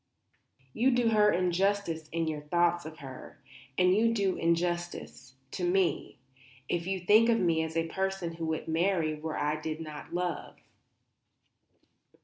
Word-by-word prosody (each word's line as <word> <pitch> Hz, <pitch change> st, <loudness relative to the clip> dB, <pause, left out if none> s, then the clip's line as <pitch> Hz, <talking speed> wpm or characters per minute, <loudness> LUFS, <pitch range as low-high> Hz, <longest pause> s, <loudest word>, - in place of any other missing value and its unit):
You 245 Hz, +4 st, +3 dB
do 245 Hz, -2 st, +3 dB
her 210 Hz, -1 st, +4 dB
injustice 180 Hz, -2 st, 0 dB
in 165 Hz, 0 st, -1 dB
your 155 Hz, -1 st, -3 dB
thoughts 175 Hz, +2 st, +1 dB
of 160 Hz, 0 st, -10 dB
her; 130 Hz, -2 st, -10 dB, 0.4 s
and 180 Hz, +1 st, +4 dB
you 230 Hz, +2 st, +3 dB
do 195 Hz, -3 st, +1 dB
me -, -, -7 dB
injustice, 170 Hz, -6 st, -2 dB, 0.2 s
too, 180 Hz, -2 st, 0 dB, 0.5 s
if 175 Hz, 0 st, -2 dB
you 190 Hz, -1 st, -2 dB
think 215 Hz, +6 st, +5 dB
of 230 Hz, -1 st, +3 dB
me 165 Hz, -4 st, +2 dB
as 160 Hz, 0 st, -3 dB
a 165 Hz, 0 st, 0 dB
person 190 Hz, -1 st, -2 dB
who 165 Hz, -1 st, -4 dB
would 160 Hz, 0 st, -3 dB
marry 165 Hz, -1 st, +1 dB
where 155 Hz, +1 st, -5 dB
I 150 Hz, +1 st, -1 dB
did 155 Hz, 0 st, -4 dB
not 155 Hz, -2 st, -8 dB
love." 175 Hz, -1 st, -3 dB
175 Hz, 150 wpm, -30 LUFS, 160-190 Hz, 0.5 s, think